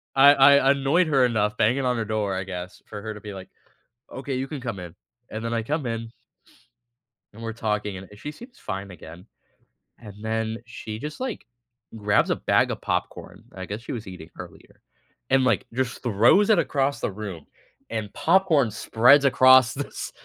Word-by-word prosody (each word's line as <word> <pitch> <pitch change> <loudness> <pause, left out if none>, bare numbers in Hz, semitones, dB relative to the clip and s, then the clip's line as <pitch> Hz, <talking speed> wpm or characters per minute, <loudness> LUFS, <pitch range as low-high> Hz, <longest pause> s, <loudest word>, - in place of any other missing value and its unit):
I 140 +1 +8
I 140 0 +6
annoyed 140 +5 +2
her 135 -4 +4
enough 105 -3 0
banging 125 +5 +2
on 125 -1 +1
her 115 - -2
door, 105 -3 -1
I 95 - -2
guess, 90 -1 -8
for 105 -1 -8
her 110 0 -5
to 105 - -11
be 105 -1 -8
like, 95 -1 -10 0.6
"Okay, 135 0 -5
you 130 +1 -3
can 145 -1 -6
come 120 -6 -5
in." 85 -2 -9 0.4
And 110 +1 -6
then 115 - -2
I 115 -1 -1
come 145 +2 -2
in 115 -1 -4 1.2
and 115 - -12
we're 115 -1 -4
talking, 105 -3 -2
and, 95 0 -10
eh, 105 - -13
she 150 +8 -7
seems 240 - -14
fine 100 0 -6
again, 85 +2 -12 0.7
and 105 -4 -11
then 110 0 -2
she 110 -2 -8
just, 150 +3 -7
like, 250 - -5 0.5
grabs 105 -1 +2
a - - +2
bag - - +2
of - - -5
popcorn - - -4
I 95 0 -6
guess 105 +3 -5
she - - -8
was 115 -4 -6
eating 90 -4 -10
earlier - - -12 0.5
and, 135 0 +4
like, - - +1
just 125 0 -3
throws 120 - +4
it 215 - +5
across 140 0 0
the - - -2
room, 95 -6 -7 0.4
and 110 -3 -4
popcorn 165 -10 +3
spreads 125 +5 +4
across 130 -2 +6
this 140 +1 -6
115 Hz, 190 wpm, -24 LUFS, 105-135 Hz, 1.2 s, I